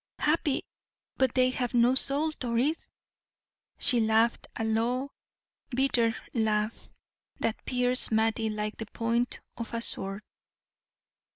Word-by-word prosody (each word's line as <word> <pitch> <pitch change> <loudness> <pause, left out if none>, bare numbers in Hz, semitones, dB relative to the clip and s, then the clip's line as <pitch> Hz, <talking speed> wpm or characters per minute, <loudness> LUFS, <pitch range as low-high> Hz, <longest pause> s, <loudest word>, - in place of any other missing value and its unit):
"Happy, 300 -2 0 0.5
but 260 -2 +1
they 255 -1 +3
have 250 -1 -3
no 240 +1 +4
soul, 280 +4 +4
Doris." 250 +6 0 0.9
She 250 -4 +3
laughed 225 +1 +2
a - - -3
low, 240 +5 -1 0.6
bitter 240 -3 +1 0.2
laugh 215 -1 -1 0.5
that 225 - -2
pierced 250 0 +4
Mattie 220 0 +1
like 210 0 -4
the 225 - -6
point 235 +3 -2 0.2
of 230 0 -6
a 230 - -2
sword. 195 -1 -1
235 Hz, 115 wpm, -28 LUFS, 220-255 Hz, 0.9 s, no